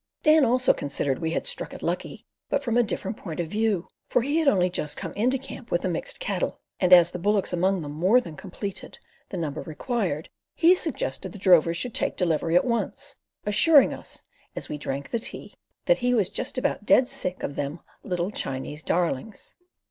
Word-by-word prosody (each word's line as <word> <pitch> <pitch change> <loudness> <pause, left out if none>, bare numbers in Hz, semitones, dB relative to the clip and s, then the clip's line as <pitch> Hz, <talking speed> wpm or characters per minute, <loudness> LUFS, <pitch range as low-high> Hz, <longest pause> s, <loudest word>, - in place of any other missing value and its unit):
Dan 305 0 +6
also 250 +2 +3
considered 140 -1 -2
we 160 - -1
had 165 - -2
"struck - - -4
it - - -10
lucky," - - -3 0.2
but 280 - 0
from 235 -4 -1
a 245 - +6
different 210 -2 -3
point 165 -4 -7
of 170 - 0
view, 210 -3 0 0.2
for 240 - +2
he 285 +4 0
had 320 - 0
only 185 -8 +4
just 150 -4 -2
come - - -5
into 250 +6 +1
camp 260 -2 -9
with 175 - 0
the - - +1
mixed 170 - -4
cattle, - - -2 0.2
and 180 -1 +2
as 175 -1 +8
the 180 - -5
bullocks 200 0 +1
among 185 0 +1
them 145 - -6
more 185 +11 +4
than 170 -11 -8
completed 195 +4 -7 0.3
the 190 - -5
number 155 -3 -3
required, 175 - -2 0.3
he 340 +2 +6
suggested 190 - -2
the - - -8
drovers 170 -3 +4
should 245 +2 -2
take - - -1
delivery 165 -2 +1
at 180 - +5
once, 235 -2 -2 0.3
assuring 280 +8 +6
us, - - -8 0.3
as - - -5
we 150 - -3
drank 140 0 -4
the 235 - 0
tea, - - -4 0.3
that - - +3
he 250 0 +2
was 205 -6 +1
just 265 - -3
about 255 - -1
dead 250 +4 +5
sick 220 -10 -3
of 140 - -3
them 145 +4 -3 0.2
"little 180 0 -2
Chinese 135 -1 -4
darlings." 175 +4 -2
190 Hz, 200 wpm, -26 LUFS, 165-245 Hz, 0.3 s, as